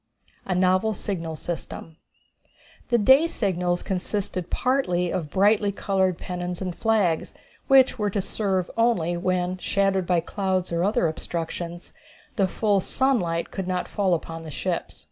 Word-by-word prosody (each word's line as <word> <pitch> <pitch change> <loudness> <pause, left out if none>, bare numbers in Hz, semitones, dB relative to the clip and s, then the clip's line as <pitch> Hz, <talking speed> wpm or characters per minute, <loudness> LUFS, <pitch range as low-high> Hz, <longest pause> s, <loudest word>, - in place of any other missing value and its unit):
A 185 - 0
Novel 185 +4 +2
Signal 165 -5 -4
System. 165 0 -6 0.9
The 240 - +4
day 265 +9 +6
signals 180 - -1
consisted 185 -1 -3
partly 180 -10 +1
of 160 -5 -2
brightly 205 +3 +3
colored 190 -3 0
pennons 180 -1 -5
and 185 -3 -4
flags, 210 -8 +1 0.3
which 265 -2 +5
were 210 -1 +1
to 200 - -1
serve 190 -2 -1
only 225 -8 +2
when, 180 +1 -1
shadowed 195 -2 +1
by 180 -2 +3
clouds 185 0 -2
or 170 +1 +1
other 195 -3 +2
obstructions, 170 +2 -5 0.4
the 195 -5 +2
full 205 +1 +1
sunlight 180 -8 0
should 190 -2 -3
not 180 -1 -1
fall 190 -3 +1
upon 165 0 -6
the 160 - -8
ships. 135 - -3
185 Hz, 145 wpm, -25 LUFS, 175-205 Hz, 0.9 s, day